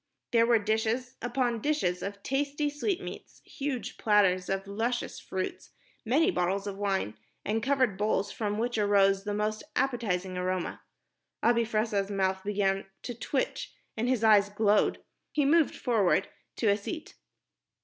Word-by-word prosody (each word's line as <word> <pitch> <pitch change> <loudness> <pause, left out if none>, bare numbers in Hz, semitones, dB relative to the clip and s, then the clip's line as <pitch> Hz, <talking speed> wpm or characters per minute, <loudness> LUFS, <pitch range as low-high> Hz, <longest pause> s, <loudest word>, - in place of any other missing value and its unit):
There 230 -2 +4
were 235 -1 +5
dishes 220 +4 -1
upon 245 -2 0
dishes 285 -12 0
of 200 0 -6
tasty 285 +2 -1
sweetmeats, 360 +6 -4
huge 275 -4 -4
platters 195 -4 +3
of 195 0 -1
luscious 225 +5 -2
fruits, 185 0 -5 0.3
many 310 - +3
bottles 195 - 0
of 200 -1 -4
wine, 195 - 0 0.3
and 220 +2 0
covered 260 -7 +1
bowls 205 -1 +1
from 210 -2 -2
which 235 0 -1
arose 195 -1 +3
the 205 0 -1
most 215 +1 -1
appetizing 190 -8 0
aroma. 185 -1 -2 0.6
Abi 235 0 +4
Fressah's 215 -3 0
mouth 190 -1 0
began 195 -1 0 0.2
to 245 - -4
twitch 255 +3 -3 0.2
and 230 +2 -1
his 250 -4 +1
eyes 205 -2 +6
glowed. 205 0 +2 0.3
He 295 -2 +2
moved 315 +2 +4
forward 205 -6 +2 0.3
to 220 - +1
a 200 - +4
seat. 315 - -6
215 Hz, 145 wpm, -29 LUFS, 195-245 Hz, 0.6 s, eyes